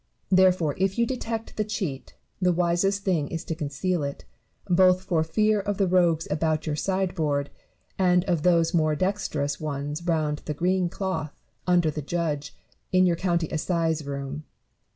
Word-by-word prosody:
Therefore, 185 -5 +4
if 195 +2 +1
you 235 - +3
detect 230 -2 -4
the 215 - +2
cheat, 190 -10 -4 0.3
the 180 -1 +4
wisest 180 +3 +1
thing 170 -7 +1
is 165 +2 -5
to - - -2
conceal 155 +3 -2
it; 140 -1 -5 0.4
both 185 0 +4
for 170 -4 +1
fear 215 +6 +2
of 200 0 -2
the 195 - +3
rogues 175 -3 +2
about 155 0 0
your 155 -2 -1
sideboard, 160 -6 -1 0.5
and 180 -1 +4
of 170 -5 0
those 170 0 +3
more 155 -2 +2
dexterous 170 -6 -1
ones 145 0 -4
round 155 -3 0
the 150 - -3
green 180 +2 +1
cloth, 170 -5 -3 0.3
under 175 -3 +3
the 150 - -4
judge, 150 -2 -3 0.3
in 185 0 +5
your 175 -2 +3
county 170 -2 0
assize 165 -1 0
room. 140 +1 -5
170 Hz, 160 wpm, -26 LUFS, 155-185 Hz, 0.5 s, in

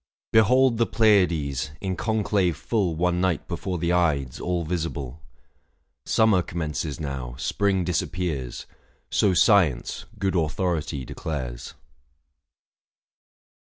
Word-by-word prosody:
Behold 125 +3 +4
the 115 - +3
Pleiades, 85 - +2
in 95 -2 -2
conclave 100 -4 0
full 100 -8 -1
One 90 +1 +1
night 90 -5 0
before 90 -2 -3
the 85 +1 0
Ides, 75 -8 +1
all 90 -1 -1
visible. 80 -4 -4 0.9
Summer 110 -4 +4
commences 80 -3 -4
now, 65 -5 -5
spring 95 +6 0
disappears, 85 -6 -3 0.5
So 95 -3 +3
science, 90 - +3
good 95 -2 -1
authority! 80 -4 -1
declares. 65 -7 -5
85 Hz, 100 wpm, -25 LUFS, 75-95 Hz, 0.9 s, Behold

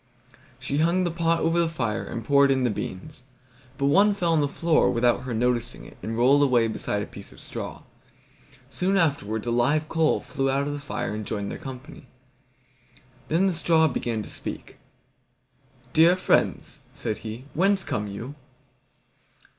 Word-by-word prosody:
She 140 - -2
hung 170 +3 +2
the 175 - 0
pot 165 0 +1
over 165 +1 +2
the 170 -1 +2
fire, 115 -8 -2
and 115 - -6
poured 140 +1 +5
in 130 -1 +2
the 120 - +2
beans; 105 +8 -6 0.6
but 140 - 0
one 200 +8 +4
fell 175 -4 0
on 160 - +3
to 145 - +2
the - - -11
floor 165 -2 +2
without 120 +1 +1
her 125 - -3
noticing 120 +1 -1
it, - - -13
and 115 +1 -4
rolled 135 +4 +5
away 125 -5 +3
beside 110 - -2
a - - -5
piece - - -11
of - - -15
straw. - - -7 0.8
Soon 185 +8 0
afterwards 115 - 0
a 120 - -1
live 145 +6 +2
coal 160 -1 +2
flew 135 0 -2
out 135 +1 +1
of 145 - -3
the 145 - -5
fire 125 -5 -4
and 105 0 -4
joined 100 -2 -3
their - - -6
company. 130 +1 -10 1.2
Then 170 +5 +2
the 190 - +2
straw 165 -1 +3
began 120 -5 -2
to - - -10
speak. - - -8 1.1
"Dear 165 +3 +6
friends," 185 - 0 0.2
said 110 - -3
he, 115 +4 -7
"whence 190 +3 +2
come 105 0 -3
you?" 115 +7 -7
140 Hz, 180 wpm, -25 LUFS, 120-165 Hz, 1.2 s, Dear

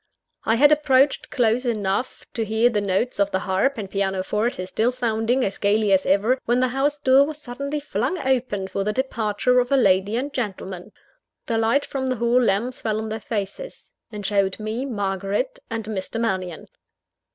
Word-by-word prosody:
I 225 - +3
had 290 +5 +6
approached 280 -2 +3
close 240 0 +1
enough 215 0 -2
to 230 - -1
hear 220 +3 +2
the 210 -2 0
notes 200 +4 -1
of 200 0 +3
the 190 - 0
harp 195 +10 0
and 205 -3 -4
pianoforte 195 +2 -1
still 225 +6 +1
sounding 240 0 0
as 195 - -3
gaily 205 0 +2
as 190 - +2
ever, 215 +7 +3
when 240 +1 +2
the 255 0 +2
house 275 +3 0
door 270 0 +5
was 300 -1 -6
suddenly 280 +3 -4
flung 275 - -2
open 255 - -1
for 195 +1 -2
the 210 +1 -1
departure 250 -1 +1
of 245 +2 -1
a 275 - +5
lady 195 -2 +3
and 275 +4 -2
gentleman. 195 -4 -5 0.5
The 230 -2 0
light 230 +6 +2
from 265 -1 -3
the 255 - 0
hall 235 +2 +2
lamps 235 +3 0
fell 215 -2 -1
on 220 0 -4
their 220 +1 -4
faces; 215 - -6 0.2
and 210 -2 -7
showed 195 -1 +1
me 220 +5 -3
Margaret 200 - -2
and 225 -2 -4
Mr. 215 +1 -4
Mannion. 185 -7 -2
225 Hz, 185 wpm, -23 LUFS, 200-255 Hz, 0.5 s, had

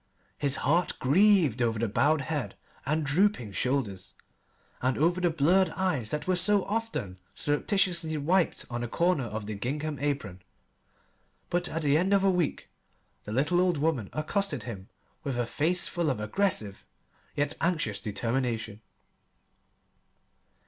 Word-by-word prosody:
His 140 -1 +1
heart 165 +4 +2
grieved 165 - +4
over 115 -2 +1
the 115 +1 0
bowed 150 +8 +2
head 145 0 -3 0.3
and 155 +1 0
drooping 145 - +2
shoulders, 100 -5 -2 0.7
and 130 +1 +1
over 175 +4 +2
the 175 - +3
blurred 170 +5 +3
eyes 155 - -1
that 150 +3 -3
were 185 - +2
so 195 +2 +3
often 210 - -3 0.2
surreptitiously 165 - 0
wiped 170 +5 +1
on 120 0 -4
a - - -2
corner 170 0 +1
of 110 -1 -5
the 105 - -4
gingham 145 +8 -3
apron. 135 -11 -3 1.1
But 175 0 0
at 160 +1 -3
the 145 +1 +3
end 190 +3 +1
of 195 - +2
a 195 - +4
week 175 -5 -2 0.5
the 105 - -6
little 150 +9 +2
old 180 -3 +2
woman 140 -9 0
accosted 155 - -2
him 100 -5 -8 0.3
with 135 -4 -3
a 120 - 0
face 165 +9 +2
full 170 -3 -1
of 130 - -1
aggressive 105 - -1 0.5
yet 145 +1 0
anxious 155 - 0
determination. 115 -1 -2
145 Hz, 145 wpm, -28 LUFS, 120-175 Hz, 1.1 s, grieved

